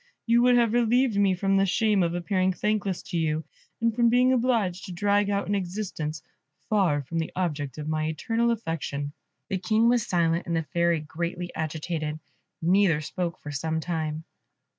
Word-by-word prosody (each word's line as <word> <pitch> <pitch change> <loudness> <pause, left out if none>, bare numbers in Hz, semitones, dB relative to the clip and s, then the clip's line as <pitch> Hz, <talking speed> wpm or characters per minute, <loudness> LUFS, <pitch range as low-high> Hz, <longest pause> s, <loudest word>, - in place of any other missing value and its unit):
You 235 0 +4
would 245 0 +5
have 230 -2 +3
relieved 240 0 +3
me 195 -2 +3
from 195 +1 +1
the 195 - +4
shame 210 +1 +2
of 170 -1 0
appearing 185 +1 +1
thankless 200 -2 -1
to 175 - -4
you, 155 0 0 0.4
and 230 -1 +1
from 235 -1 +4
being 250 +2 +4
obliged 230 -8 +1
to - - -7
drag 205 +3 +1
out 200 0 0
an 205 - 0
existence 180 -6 -3 0.4
far 180 -9 +2
from 165 +5 -3
the 160 - -3
object 150 -7 -2
of 150 0 -5
my 155 0 0
eternal 225 +9 0
affection." 165 -9 -3 0.4
The 190 -3 -1
King 215 +5 +3
was 240 -2 +2
silent, 170 -1 +1
and 170 - 0
the 165 - 0
Fairy 170 0 +1
greatly 170 +3 -4
agitated; 155 0 -3 0.5
neither 180 -2 +4
spoke 170 +2 -3
for 150 - -7
some 160 +3 -2
time. 160 -1 -3
180 Hz, 180 wpm, -26 LUFS, 160-210 Hz, 0.5 s, would